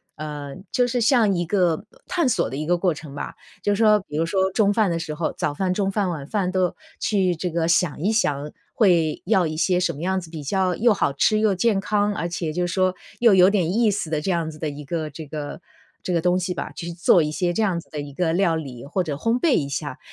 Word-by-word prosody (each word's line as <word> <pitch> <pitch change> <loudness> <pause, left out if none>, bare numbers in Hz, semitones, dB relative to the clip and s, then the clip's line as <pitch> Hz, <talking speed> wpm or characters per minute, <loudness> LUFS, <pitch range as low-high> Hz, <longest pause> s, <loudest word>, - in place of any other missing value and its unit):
呃 145 -2 -6 0.2
就 245 -1 +3
是 245 0 -1
像 225 -4 +4
一 175 -1 -1
个 175 -3 +1 0.2
探 340 -5 +1
索 230 - +1
的 135 - -5
一 155 - -3
个 175 +2 +2
过 175 -1 +1
程 150 -2 -10
吧。 - - -6 0.3
就 205 - +2
是 210 - -1
说 215 -1 +6
比 150 - -4
如 165 - +1
说 190 +2 +1
中 205 +1 +3
饭 215 -3 +2
的 165 - -1
时 160 -2 -4
候 155 +2 -2
早 145 - -1
饭、 185 +3 -1
中 195 0 0
饭、 200 -2 0
晚 150 -5 -5
饭， 190 -1 -1
都 185 -2 0 0.2
去 190 -4 +1
这 180 +2 -3
个 165 0 0
想 170 -4 +1
一 200 +6 +2
想， 150 -9 0 0.2
会 170 -7 +2
要 185 -4 +3
一 155 - -4
些 180 +2 +2
什 180 - 0
么 145 - -8
样 190 +2 0
子 170 -3 -10
比 155 -3 -7
较 185 +4 0
又 235 -1 +4
好 145 - 0
吃 215 +9 +2
又 215 -3 +2
健 200 +1 +2
康， 205 +1 0
而 170 -4 -2
且 170 -2 -3
就 175 +2 -1
是 175 - -4
说 185 -1 +2 0.3
又 230 -4 +6
有 185 0 +7
点 185 -4 +1
意 230 0 +3
思 200 -5 -2
的， 155 -2 0
这 185 +5 -1
样 165 -2 -1
子 155 - -13
的 155 - -2
一 145 +1 -8
个 160 -1 -3
这 155 +2 -9
个 150 +3 -6 0.4
这 180 - -2
个 170 - +2
东 180 +1 +2
西 180 0 -2
吧。 - - -5
去 170 0 -6
做 170 0 +4
一 150 - -2
些 175 +2 0
这 225 - 0
样 185 -5 +1
子 - - -14
的 150 - -6
一 145 -1 -8
个 165 +1 0
料 175 -3 +2
理， 135 -6 -6
或 185 +6 -1
者 150 -4 -3
烘 230 +8 0
焙 310 -1 +3
一 140 - 0
下。 145 -1 -4
175 Hz, 285 characters per minute, -23 LUFS, 155-200 Hz, 0.4 s, 有